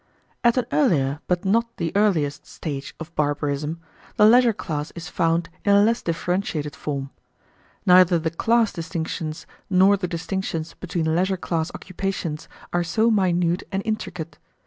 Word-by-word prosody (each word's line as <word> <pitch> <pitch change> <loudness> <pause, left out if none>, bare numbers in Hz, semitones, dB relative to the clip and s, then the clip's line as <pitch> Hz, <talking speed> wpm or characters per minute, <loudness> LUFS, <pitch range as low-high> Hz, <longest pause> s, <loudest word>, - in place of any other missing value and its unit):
At 235 +1 +4
an 250 - +2
earlier, 150 - +2
but 180 +1 0
not 230 +4 +1
the 165 -1 -2
earliest, 170 -9 +1
stage 140 -4 -6
of 165 +1 -8
barbarism, 145 +1 -1 0.4
the 210 - +6
leisure 240 +2 +6
class 155 -7 -4
is 170 -1 -7
found 165 0 +1 0.2
in 200 -1 +4
a 200 - +6
less 230 +2 +2
differentiated 165 -3 -2
form. 140 -1 -4 0.7
Neither 180 -1 +6
the 160 0 -2
class 225 +6 +2
distinctions 160 -1 -4 0.2
nor 195 +1 +5
the 185 -2 -2
distinctions 170 -1 -3
between 160 -3 -2
leisure 190 +2 +1
class 165 -2 -2
occupations 185 -4 -4 0.2
are 175 0 +2
so 220 +7 +2
minute 180 -4 +2
and 195 0 -2
intricate. 180 -7 -4
175 Hz, 145 wpm, -23 LUFS, 160-200 Hz, 0.7 s, the